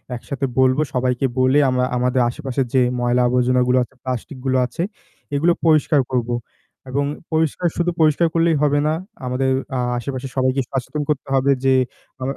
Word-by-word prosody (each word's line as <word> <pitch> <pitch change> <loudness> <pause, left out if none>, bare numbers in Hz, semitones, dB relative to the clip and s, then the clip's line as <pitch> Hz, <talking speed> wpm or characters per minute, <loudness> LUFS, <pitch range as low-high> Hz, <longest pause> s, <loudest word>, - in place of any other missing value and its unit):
একসাথে 135 +3 -4
বলবো। 130 +3 +4
সবাইকে 125 +1 0
বলে 130 +3 +4
আমরা 125 0 +1
আমাদের 125 +1 +1
আশেপাশের 135 -1 -2
যে 130 - +4 0.2
ময়লা 120 +1 +2
আবর্জনা 125 0 +2
গুলো 125 +1 +3
আছে, 135 - -13
প্লাস্টিক 130 +1 -4
গুলো 130 0 +2
আছে, 130 +8 -4 0.5
এগুলো 170 +4 +3
পরিষ্কার 155 -2 +4
করব। 120 -1 0 0.6
এবং 140 +2 0 0.3
পরিষ্কার 160 +2 +1
শুধু 175 0 +1
পরিষ্কার 155 +2 +4
করলেই 165 -1 +3
হবে 145 0 +3
না। 155 - +2 0.3
আমাদের 130 +1 0 0.3
আ - - 0 0.2
আশেপাশে 130 +2 -4
সবাইকে 130 +1 +1
সচেতন 135 +3 -3
করতে 145 -2 -1
হবে 135 +1 +3
যে 135 0 +4 0.5
অ - - -3
130 Hz, 165 wpm, -20 LUFS, 125-150 Hz, 0.6 s, বলবো